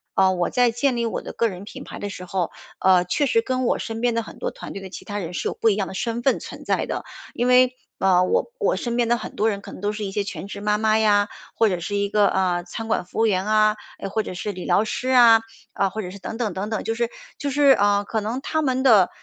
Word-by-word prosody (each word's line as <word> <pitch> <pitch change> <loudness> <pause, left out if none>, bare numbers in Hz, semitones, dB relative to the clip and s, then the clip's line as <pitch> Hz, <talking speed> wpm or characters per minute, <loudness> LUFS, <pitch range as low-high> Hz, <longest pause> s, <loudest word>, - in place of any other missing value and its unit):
啊， 190 -1 +4
我 175 -2 0
在 245 -2 +3
建 245 +2 0
立 235 - 0
我 225 - -2
的 - - -7
个 230 - +1
人 190 -3 -7
品 205 - -9
牌 - - -9
的 205 - -4
时 185 -2 -8
候， 180 -2 -2 0.3
呃， 185 -1 +4
确 285 - +1
实 230 -4 +3
跟 255 +2 -1
我 - - +1
身 225 -1 -5
边 240 -1 +2
的 230 - +1
很 - - -12
多 - - -3
团 - - -9
队 195 - -6
的 190 - -8
其 - - -9
他 205 -1 -4
人 175 -2 -5
是 - - -2
有 - - -2
不 225 - +2
一 205 - +2
样 195 -2 -1
的 - - -7
身 230 +4 -2
份 270 - +2
存 - - -10
在 - - +1
的。 - - -4 0.3
因 245 - 0
为， 250 0 +5 0.2
呃， 185 -2 +4
我 185 - 0
我 425 - +2
身 235 -1 -3
边 240 -1 +2
的 240 +1 +3
很 - - -8
多 220 +2 +2
人 200 -2 -2
可 - - -10
能 - - -10
都 205 - 0
是 210 0 -5
一 195 - -4
些 205 +1 -1
全 200 -1 -6
职 200 - -7
妈 210 0 +1
妈 215 0 +3
呀， 205 -1 +3 0.3
或 225 - +4
者 180 -3 -1
是 205 +4 -4
一 200 0 0
个， 210 -1 +4
呃， 180 -2 +1
餐 220 +5 -6
馆 220 -5 0
服 180 - -6
务 225 - +4
员 190 -2 +1
啊， 215 0 +3 0.2
诶， - - -4
或 210 +3 -1
者 - - -6
是 205 +3 -3
理 180 -2 -7
疗 - - +3
师 250 +4 -3
啊， 235 -3 +7 0.3
啊， 195 - +1
或 220 +3 -4
者 180 - -6
是 200 - -9
等 210 +4 -6
等 225 -5 -1
等 195 +3 -4
等， 220 - -2
就 225 - -1
是 235 0 0 0.3
就 285 - -2
是 285 0 +5
呃， 205 -4 +3
可 220 +2 -2
能 225 +5 -3
他 315 +3 -1
们 260 -3 0
的 215 -9 +6
215 Hz, 315 characters per minute, -23 LUFS, 195-235 Hz, 0.3 s, 啊